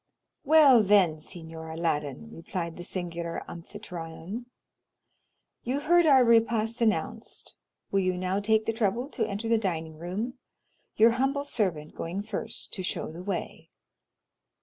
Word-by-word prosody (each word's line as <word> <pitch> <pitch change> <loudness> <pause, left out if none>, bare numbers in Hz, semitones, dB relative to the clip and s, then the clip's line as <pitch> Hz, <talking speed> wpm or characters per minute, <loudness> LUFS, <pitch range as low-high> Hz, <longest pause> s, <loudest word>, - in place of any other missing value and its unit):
"Well, 290 -5 +7
then, 190 -6 +4
Signor 160 0 -8
Aladdin," 150 - -2
replied 170 0 -5
the 175 - -8
singular 170 -2 -4
Amphitryon, 170 +5 -7 1.1
"you 260 +4 -1
heard 345 +2 +4
our 270 -3 +7
repast 230 0 +3
announced, 220 -2 -1 0.4
will 195 - +3
you 185 -1 0
now 185 +2 0
take 215 +1 +2
the 225 - 0
trouble 230 +4 0
to 225 -7 -1
enter 205 +2 -4
the 230 0 +3
dining 160 -6 -3
room, 210 +9 -4 0.6
your 225 +2 +6
humble 270 +4 0
servant 185 - -1
going 180 +5 -4
first 225 +1 -6
to 190 - -4
show 180 - -3
the 165 +2 -8
way?" 195 +2 -4
200 Hz, 135 wpm, -28 LUFS, 170-230 Hz, 1.1 s, Well